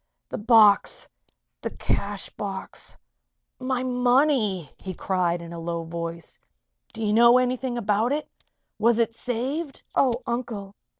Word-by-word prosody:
"The - - -4
box 215 -2 +5 0.5
the - - -2
cash 200 0 -2
box 195 -2 -7 0.6
my 255 -1 -1
money!" 250 - +2
he 185 -1 -7
cried, 175 -2 0
in 170 0 -9
a 170 - -6
low 170 0 -3
voice. 170 0 -6 0.5
"Do 225 -1 -4
you 210 - +1
know 235 +2 +7
anything 255 0 0
about 220 +2 +1
it? 300 +1 -1 0.5
Was 230 0 +4
it 230 -1 +2
saved?" 260 +6 -3
"Oh, 250 -2 +2
Uncle! 230 -5 -4
225 Hz, 130 wpm, -25 LUFS, 190-250 Hz, 0.6 s, know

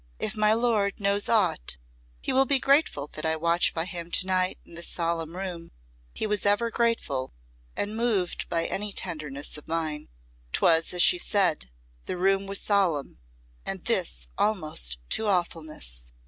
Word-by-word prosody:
If - - -2
my 215 0 +3
lord 220 -4 +1
knows 200 0 +1
aught, 180 - +1 0.4
he - - -1
will 270 +1 +5
be 280 - +4
grateful 275 - +2
that 155 - -4
I 160 0 +2
watch 170 +2 +2
by 165 0 0
him 170 -2 -4
to - - +3
night 185 -1 +1
in - - -16
this 170 +1 -3
solemn 165 -1 -2
room. 180 -3 -5 0.4
He - - -3
was 210 -1 +1
ever 205 +3 +2
grateful, 155 - -1 0.4
and 210 +1 -2
moved 220 -6 0
by 165 -1 0
any 205 +1 -1
tenderness 150 -6 -3
of 150 - -9
mine." 160 -2 -2 0.4
'Twas 165 0 +3
as 180 -1 +5
she 360 - +6
said, 185 - +1 0.4
the - - -3
room 195 +2 +2
was 195 0 0
solemn, 180 - 0 0.4
and - - -4
this - - 0
almost 155 - +1
to 220 - +2
awfulness. 155 - -2
180 Hz, 160 wpm, -27 LUFS, 160-205 Hz, 0.4 s, she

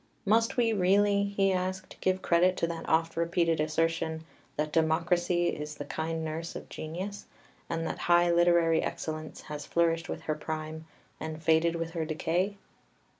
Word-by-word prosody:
2 - - -3
"Must 225 +3 +3
we 230 -2 +3
really," 200 +1 +3
he 195 -1 +1
asked, 185 +1 -3
"give 185 0 +1
credit 180 +2 +3
to - - +1
that 165 -1 -5
oft 165 +1 +2
repeated 170 -1 +1
assertion 160 +1 0 0.3
that 150 0 -1
democracy 175 +2 +2
is 150 0 -5
the 145 - -6
kind 160 0 -3
nurse 160 +2 -4
of - - -7
genius, 185 +6 -6 0.4
and 165 0 -2
that - - -3
high 175 0 +4
literary 170 -1 +4
excellence 155 -1 -5
has 150 -1 -7
flourished 165 0 +1
with - - -4
her 155 - -1
prime 155 +1 -5 0.3
and 160 0 -6
faded 165 +1 +3
with 165 0 -3
her 165 -1 -2
decay? 170 +5 -1
165 Hz, 165 wpm, -29 LUFS, 160-180 Hz, 0.4 s, high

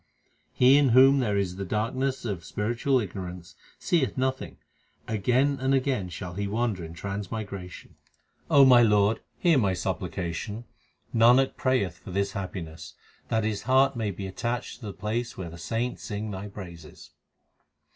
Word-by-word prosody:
He 130 +3 +5
in 140 -2 +3
whom 135 +1 +7
there 105 -6 0
is 95 -2 -1
the 100 - -3
darkness 120 +7 -2
of 95 -7 -3
spiritual 120 +8 0
ignorance 90 -4 -6 0.2
seeth 155 -7 0
nothing; 130 0 -2 0.5
again 125 +6 +1
and 135 +1 +2
again 130 -8 0
shall 90 +1 -7
he 100 +2 -3
wander 110 -3 -1
in 80 +1 -8
trans 100 +2 -5
migration. 100 -5 -7 0.5
O 140 -1 +7
my 125 -2 +7
Lord, 105 -1 +3 0.2
hear 170 -6 +4
my 95 -5 +1
supplication; 90 +4 -4 0.5
Nanak 120 +4 +5
prayeth 115 - 0
for - - -12
this 100 +2 -1
happiness 90 -5 -7 0.3
That 110 -1 0
his 105 -1 -1
heart 135 +1 +4
may 110 -3 -1
be 100 0 -6
attached 120 +5 -4
to 115 - -8
the 100 - -5
place 110 +4 -3
where 85 -3 -6
the 85 - -11
saints 115 +7 -3
sing 105 0 -4
Thy 95 +1 -6
praises. 85 -6 -11
105 Hz, 155 wpm, -27 LUFS, 95-125 Hz, 0.5 s, whom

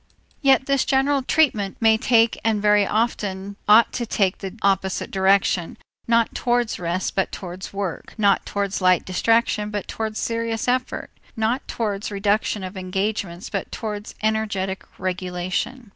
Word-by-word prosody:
Yet 270 -2 +4
this 275 -1 +2
general 275 +1 +2
treatment 250 -9 +1
may 225 -1 +5
take 230 0 +3
and 220 -2 +2
very 210 -1 +4
often 200 -3 -1
ought 215 +3 +6
to 240 -2 -3
take 195 -4 +1
the 195 +1 -7
opposite 190 -1 0
direction, 190 -2 +2 0.3
not 230 -1 +3
towards 240 -2 0
rest 175 +2 -2
but 195 - 0
towards 185 0 -7
work, 195 -4 -5
not 200 -2 +3
towards 200 -1 -2
light 185 -1 +4
distraction 210 +2 +1
but 205 -1 -4
towards 220 -1 -4
serious 230 -1 -2
effort, 255 +1 -1 0.3
not 225 +4 0
towards 210 -3 -2
reduction 205 0 0
of 185 +2 -6
engagements 190 -1 -3
but 195 -3 -3
towards 210 -2 -5
energetic 205 -3 -1
regulation. 185 +6 -3
210 Hz, 145 wpm, -23 LUFS, 190-230 Hz, 0.3 s, ought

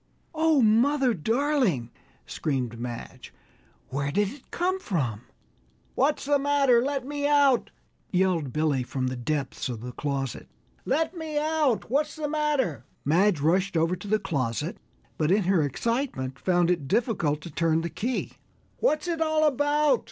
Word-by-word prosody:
"Oh, 315 -4 +3
mother, 250 +4 +3
darling!" 225 - 0 0.3
screamed 125 -6 -3
Madge, 120 0 -7 0.6
"where 140 +1 -2
did 205 +5 +1
it 265 +4 -13
come 370 +2 -1
from?" 135 - -2 0.7
"What's 285 +2 +1
the 285 0 +3
matter? 275 -4 +3
Let 275 0 -2
me 285 +1 -2
out!" 285 -4 +4 0.4
yelled 180 -7 +1
Billy 150 -3 +1
from 130 +1 -3
the 130 0 -2
depths 135 +2 -3
of 115 -3 -5
the 125 +1 -6
closet; 135 -2 -3 0.4
"let 325 +4 0
me 320 -3 -4
out! 300 -7 +1
What's 290 +3 +1
the 310 -2 -3
matter?" 290 - 0 0.2
Madge 175 +2 +3
rushed 180 +4 +2
over 165 +3 +2
to 205 - -10
the 215 +2 +3
closet, 145 - -2 0.4
but 155 -1 +2
in 200 +3 +3
her 180 -2 +3
excitement 145 - -2
found 175 -1 +2
it 165 -6 -1
difficult 195 - +1
to 170 - -9
turn 165 +1 +1
the 170 - -3
key. 245 +3 -2 0.5
"What's 310 -8 +1
it 330 -2 -2
all 315 -1 +2
about?" 290 -1 +2
205 Hz, 150 wpm, -26 LUFS, -, 0.7 s, out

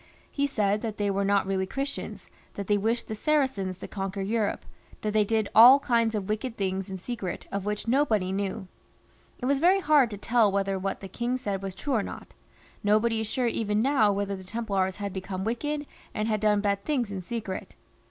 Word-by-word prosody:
He 280 -1 0
said 210 -6 +1
that, 220 -3 -4
they 205 -1 +1
were 200 0 0
not 200 0 +2
really 190 -1 -1
Christians, 275 +5 -5 0.3
that 200 - -4
they 205 - +2
wished 225 +4 0
the 220 - -4
Saracens 215 -7 0
to - - -7
conquer 195 0 -4
Europe, 210 +1 -1 0.4
that 210 -1 -2
they 215 -1 +4
did 220 0 0
all 240 +5 +10
kinds 230 -4 +1
of 200 -3 -2
wicked 225 +3 -3
things 190 0 -2
in 190 - -4
secret, 195 -2 -5
of 200 -1 -3
which 210 +1 -3
nobody 230 -8 +2
knew. 195 -1 -3 0.7
It - - -5
was 275 +1 +2
very 365 +5 +5
hard 295 -7 +4
to 205 - -6
tell 225 0 +3
whether 195 -1 0
what 195 +1 -3
the 195 - -6
king 240 +6 -2
said 200 -6 -3
was 195 -1 -5
true 285 +5 -3
or 225 - +3
not. - - -8 0.5
Nobody 220 +2 +3
is 220 - -3
sure 250 +3 -1
even 220 -2 0
now 260 -6 +4
whether 200 0 -1
the 190 - -9
Templars 195 -2 -1
had 200 -2 -5
become 190 0 -4
wicked, 290 +7 -2 0.3
and 215 0 -1
had 215 -1 +1
done 210 -1 +3
bad 200 -1 0
things 245 -5 -1
in 190 -2 -4
secret. 205 -1 -5
210 Hz, 210 wpm, -27 LUFS, 195-235 Hz, 0.7 s, all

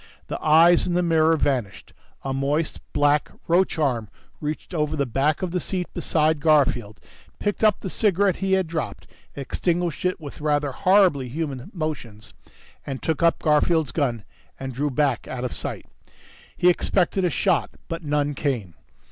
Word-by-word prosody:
The - - -4
eyes 165 +3 +5
in 175 - 0
the 180 - +2
mirror 160 -1 +3
vanished. 125 -9 -2 0.3
A 135 - -2
moist, 145 +4 -1
black 145 0 +2 0.2
roach 175 +2 +2
arm 125 -9 0 0.3
reached 150 +4 -5
over 150 -2 0
the 140 -2 0
back 140 - 0
of 180 - -2
the 180 - 0
seat 180 0 -4
beside 155 -1 +1
Garfield, 135 -8 +2 0.4
picked 205 +1 -2
up 215 -3 +4
the - - -5
cigarette 200 -3 +2
he 195 0 0
had 190 -1 +3
dropped, 160 -1 -4 0.3
extinguished 170 +4 -2
it 180 0 0
with 150 -1 -9
rather 145 -1 +1
horribly 180 -5 +3
human 140 -1 -4
motions, 125 - -6 0.5
then 135 - -4
took 160 +3 -2
up 170 0 +2
Garfield's 155 -1 +2
gun 120 -8 -1 0.3
and 130 -1 -5
drew 145 +4 -1
back 140 -5 0
out 125 -1 -5
of 125 - -3
sight. - - -5 0.7
He 180 - +3
expected 185 +1 +2
a 180 - +3
shot, 175 0 +1 0.2
but 165 0 -4
none 145 -1 0
came. 125 - -2
150 Hz, 165 wpm, -24 LUFS, 135-170 Hz, 0.7 s, eyes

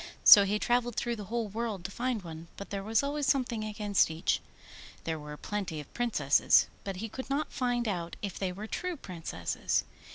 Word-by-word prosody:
So 200 -1 +11
he 205 +2 +1
travelled 240 +1 +1
through 240 -1 -1
the 205 - -6
whole 230 +1 -2
world 210 -3 -4
to 195 - -4
find 240 -2 -2
one, 165 -1 -8
but 200 - -8
there 200 -1 -2
was 220 +5 +1
always 285 0 -1
something 245 -5 +1
against 210 -3 +2
each. 160 0 0 0.6
There 160 -1 -2
were 150 0 -8
plenty 190 -6 -3
of 145 - -10
Princesses, 180 - +4 0.2
but 195 -1 -4
he 215 +5 -4
could 260 +5 -7
not 280 +3 -1
find 245 -2 0
out 175 -4 -3
if 200 -3 -4
they 190 -2 -1
were 200 +4 -6
true 360 +9 -3
Princesses. 180 - -2
210 Hz, 195 wpm, -30 LUFS, 180-240 Hz, 0.6 s, So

